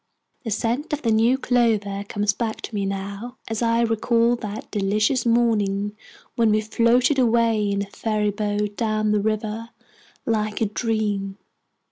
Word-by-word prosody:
The 230 - -4
scent 235 +8 -1
of 295 - -2
the 230 - +2
new 230 +4 +4
clover 220 -6 +1
comes 205 0 0
back 220 +1 -3
to - - -7
me 200 -2 -1
now, 200 +5 -5
as 225 0 -3
I 230 0 +2
recall 230 +1 +2
that 210 -2 -7
delicious 215 +5 +1
morning 210 -3 +1 0.4
when 230 -2 +3
we 215 0 +3
floated 235 +5 +2
away 230 -3 +2
in 200 0 0
a 200 - -11
fairy 215 -2 -1
boat 205 0 -2
down 215 -2 0
a 210 - +2
river 215 +2 -2 0.6
like 215 -2 -1
a 225 - +2
dream! 210 -3 -2
220 Hz, 155 wpm, -23 LUFS, 205-230 Hz, 0.6 s, new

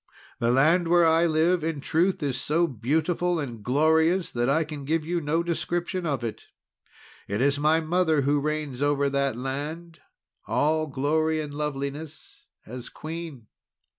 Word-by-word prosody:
The 115 - +1
land 160 +8 +3
where 175 0 +5
I 165 +1 +4
live, 165 +2 +2
in 160 -2 -2
truth, 170 +4 0
is 130 -3 -1
so 165 +3 +2
beautiful 160 - 0
and 120 -7 -5
glorious 160 - +2
that 120 +1 0
I 160 +4 +3
can 150 -2 -7
give 155 +2 -1
you 170 +1 -1
no 160 +3 0
description 175 +1 -2
of 140 -4 -2
it. 115 -2 -5 0.8
It 100 +1 -2
is 140 +2 +2
my 155 +2 +3
mother 160 -2 +2
who 145 +2 +2
reigns 150 -3 -3
over 145 -1 +1
that 140 -2 0
land, 150 +7 -5 0.5
all 155 +8 +1
glory 155 +3 0
and 150 -2 -5
loveliness 145 +1 -6 0.2
as 125 +1 -8
Queen." 160 -6 -7
155 Hz, 155 wpm, -26 LUFS, 140-165 Hz, 0.8 s, where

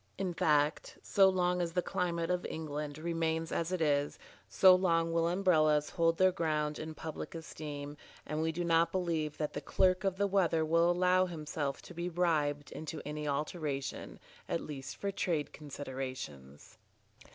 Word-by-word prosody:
In 190 -2 -2
fact, 150 -1 +1
so 195 -1 +5
long 180 -1 +1
as 170 -1 -2
the 180 0 +1
climate 175 -3 -1
of 180 0 0
England 150 -2 -5
remains 165 0 -1
as 165 +1 -1
it 185 -2 -1
is, 145 -2 +1 0.3
so 185 -1 +7
long 165 -3 +2
will 165 0 +2
Umbrellas 155 -5 +3
hold 165 -1 +2
their 185 0 +5
ground 150 -3 -1
in 155 0 -6
public 160 +1 -6
esteem, 150 -3 -6 0.3
and 155 +1 -2
we 160 0 +1
do 175 +2 -3
not 165 0 +3
believe 165 -5 -1
that 150 -1 -2
the - - -4
clerk 185 0 +2
of 190 -1 0
the 200 - +2
weather 175 -5 +2
will 165 +2 +3
allow 180 +1 +3
himself 150 -4 -4
to - - -11
be 170 +1 -3
bribed 150 -5 0
into 155 0 -6
any 150 0 -4
alteration, 145 -1 -3 0.3
at - - 0
least 135 -2 -7
for 200 - -2
trade 165 -6 -1
considerations. 130 - -7
160 Hz, 165 wpm, -32 LUFS, 150-175 Hz, 0.3 s, so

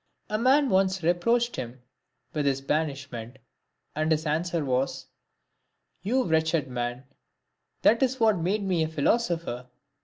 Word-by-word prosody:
A 215 - 0
man 270 +4 +4
once 190 -1 +2
reproached 230 +8 +1
him 125 0 -7 0.5
with 150 -2 0
his 135 -1 +1
banishment, 135 -5 -3 0.6
and 155 +1 0
his 155 +1 +1
answer 160 +1 -1
was, 130 0 -1 0.5
" - - -50
You 255 +6 +1
wretched 160 -3 +1
man, 120 0 -4 0.8
that 230 +4 +5
is 260 0 +1
what 220 -5 +3
made 195 +5 0
me 185 -4 +1
a 160 - +1
philosopher." 160 - -1
160 Hz, 135 wpm, -27 LUFS, 135-200 Hz, 0.8 s, that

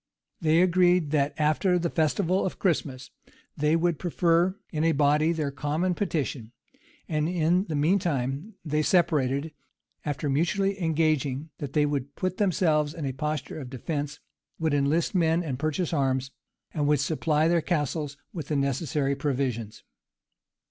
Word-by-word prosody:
[] - - -51
They 160 +2 +4
agreed 180 -3 +3
that, 145 -2 +1
after 155 +5 +2
the 170 -1 -1
festival 175 +4 +1
of 190 - -3
Christmas, 140 -8 -1 0.4
they 150 +2 +2
would 165 -2 +1
prefer 175 +1 +2 0.2
in 155 -1 -1
a 165 0 +3
body 150 +2 +3
their 155 -4 -1
common 150 +6 -1
petition; 145 - -3 0.5
and 155 0 0
in 175 +2 +2
the 160 - -4
mean 160 +7 +3
time 145 - -2
they 150 0 +1
separated, 150 -3 +1 0.5
after 145 0 -3
mutually 195 +7 0
engaging 155 -3 0
that 140 -2 -5
they 150 -1 +3
would 140 -1 -3
put 185 -1 -2
themselves 160 -6 +1
in 160 -4 -4
a 135 - -2
posture 150 +3 -3
of 130 -4 -7
defence, 145 +3 -4 0.4
would 160 -2 0
enlist 145 +4 +1
men 170 -1 +2
and 135 -6 -4
purchase 155 +3 -1
arms, 135 -2 0 0.4
and 145 -2 0
would 150 -1 +3
supply 155 +2 +1
their 170 0 +3
castles 150 -3 -2 0.2
with 160 -5 -5
the 150 - -1
necessary 140 0 0
provisions. 125 -7 -2
155 Hz, 155 wpm, -27 LUFS, 140-170 Hz, 0.5 s, They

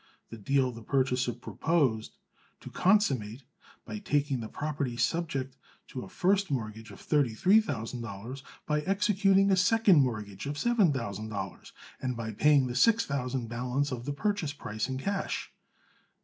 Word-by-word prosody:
This 115 - -8
deal 130 +4 +1
the 115 -1 -10
purchaser 125 0 +1
proposed 125 -1 -1 0.4
to - - -9
consummate 135 - +2 0.4
by 215 - -6
taking 145 -8 0
the 110 - -5
property 140 -3 -3
subject 135 -1 -1 0.3
to 130 - -6
a - - -9
first 195 +1 +1
mortgage 110 -4 -4
of 100 - -12
thirty 140 -7 +1
three 200 - +5
thousand 120 - -4
dollars, 115 +5 -7 0.2
by 150 0 0
executing 195 +1 +3
a - - +5
second 190 -3 +5
mortgage 105 -3 -3
of 145 +1 -3
seven 220 -3 +3
thousand 110 -5 -4
dollars, 100 -3 -6 0.3
and 125 -2 -2
by 110 -1 -4
paying 140 +5 +4
the 125 - -3
six 230 - +4
thousand 125 -3 -2
balance 125 +4 -1
of 120 -1 -5
the 145 - -2
purchase 190 -2 -1
price 110 -4 -4
in 130 - -2
cash. 195 +8 -3
135 Hz, 160 wpm, -29 LUFS, 115-170 Hz, 0.4 s, three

